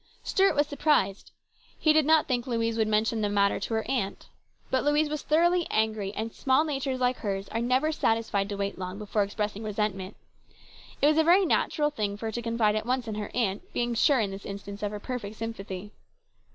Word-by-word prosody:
Stuart 390 -4 +3
was 290 0 +3
surprised. 285 -9 +1 0.5
He 310 - +4
did 310 -2 +3
not 315 -1 +5
think 245 -1 -1
Louise 230 -2 0
would 220 -1 +1
mention 215 +1 +1
the 205 - +1
matter 200 -1 +2
to - - -4
her 220 - -1
aunt. 235 -8 -2 0.4
But 260 - +2
Louise 295 +1 +2
was 300 0 -3
thoroughly 345 +3 +2
angry, 215 -2 0
and 220 +1 -4
small 265 +3 +2
natures 270 -4 -2
like 250 0 +1
hers 195 -1 -3
are 225 - -2
never 255 +6 +2
satisfied 225 -7 0
to 200 - -4
wait 200 -1 -3
long 185 +1 -5
before 210 0 -1
expressing 205 +1 -2
resent 210 -1 -1
ment. 190 +1 -8 0.9
It - - +7
was 305 +1 +4
a - - +5
very 360 +4 +5
natural 300 -2 +1
thing 205 -7 -2
for 225 - -7
her 220 - -2
to 240 - -4
confide 230 -2 +1
at 215 +1 -2
once 250 -1 0
in 220 - -3
her 210 0 -4
aunt, 210 -5 -1
being 240 0 0
sure 260 +4 +4
in 205 -3 0
this 195 +1 -8
instance 200 0 -7
of 205 - -1
her 210 0 -6
perfect 220 -3 -5
sympathy. 210 -3 -6
225 Hz, 215 wpm, -27 LUFS, 205-270 Hz, 0.9 s, It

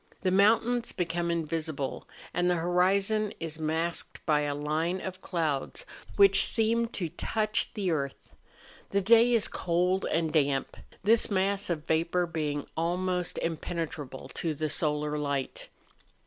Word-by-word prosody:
The 185 - +2
mountains 225 +5 +3
become 170 -1 -2
invisible, 160 -4 -3 0.3
and 180 0 +1
the 180 - +3
horizon 195 +5 +1
is 160 -1 -5
masked 160 +2 -2
by 150 -2 +3
a 145 -1 -1
line 155 +5 -1
of 185 0 -7
clouds 155 -7 -2 0.3
which 195 -1 +7
seem 230 +1 +2
to 185 -7 -4
touch 215 +6 -1
the 195 -5 -1
earth. 140 -4 -4 0.6
The 200 - +1
day 230 +4 +5
is 230 -3 +4
cold 180 +2 0
and 160 -1 0
damp,— 140 -3 +1 0.3
this 220 +3 +3
mass 200 0 0
of 160 -3 -2
vapour 170 +3 +1
being 150 -3 -3
almost 180 +2 -1
impene¬ 165 0 -2
trable 135 -3 -9
to 160 -3 -2
the 155 +1 -2
solar 150 -1 0
light. 140 -2 -3
170 Hz, 140 wpm, -29 LUFS, 155-195 Hz, 0.6 s, which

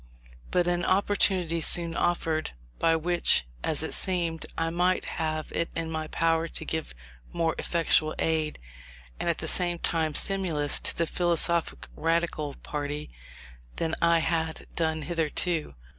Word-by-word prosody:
But 180 -1 +1
an 175 0 0
opportunity 185 -3 +1
soon 170 +1 +5
offered, 165 - -1 0.3
by 165 0 +3
which, 170 - +3 0.2
as - - +3
it - - 0
seemed, 170 -3 +2
I 165 0 -1
might 180 +2 +1 0.2
have 155 -1 -3
it 165 - -1
in 165 -1 -3
my 160 -1 -3
power 165 +1 0
to - - -7
give 160 - -4 0.4
more 165 -1 0
effectual 160 -2 +2
aid, 160 -1 -1 0.6
and - - -1
at - - +1
the - - -4
same 175 -1 0
time, 160 -3 -1
stimulus, 170 -7 +2
to - - -2
the 170 - +1
"philosophic 170 0 0
Radical" 165 -3 -1
party, 145 - -5 0.6
than 160 -1 -2
I 170 0 +4
had 160 -1 -1
done 160 -2 -1
hitherto. 165 +1 -2
165 Hz, 145 wpm, -27 LUFS, 160-175 Hz, 0.6 s, soon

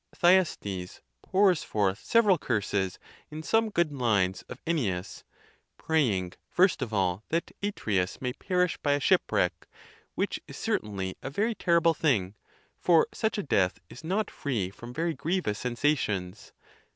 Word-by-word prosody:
Thyestes 155 - +2 0.2
pours 190 -3 +3
forth 100 -1 -1
several 210 -7 +4
curses 100 -6 -1 0.3
in 155 +1 -7
some 225 +5 +2
good 170 -6 +1
lines 105 -8 +1
of 125 - -8
Ennius, 105 - -2 0.5
praying, 110 - 0 0.2
first 185 -3 +3
ef 125 -4 -3
all, 95 -1 0
that 165 +1 -1
Atreus 105 - -1
may 125 -1 -2
perish 180 +3 0
by 145 - +1
a 145 - +1
shipwreck, - - +1 0.5
which - - -1
is - - -9
certainly 95 -3 -2
a - - -5
very 210 +11 0
terrible 170 -4 +3
thing, 115 - +1 0.5
for 170 -3 +5
such 220 -2 -1
a 205 - -1
death 95 - +1
is 125 - -11
not 195 +6 -1
free 110 -10 -2
from 120 +4 -10
very 165 +5 -1
grievous 160 - -1
sensations. 110 -7 -1
135 Hz, 140 wpm, -28 LUFS, -, 0.5 s, for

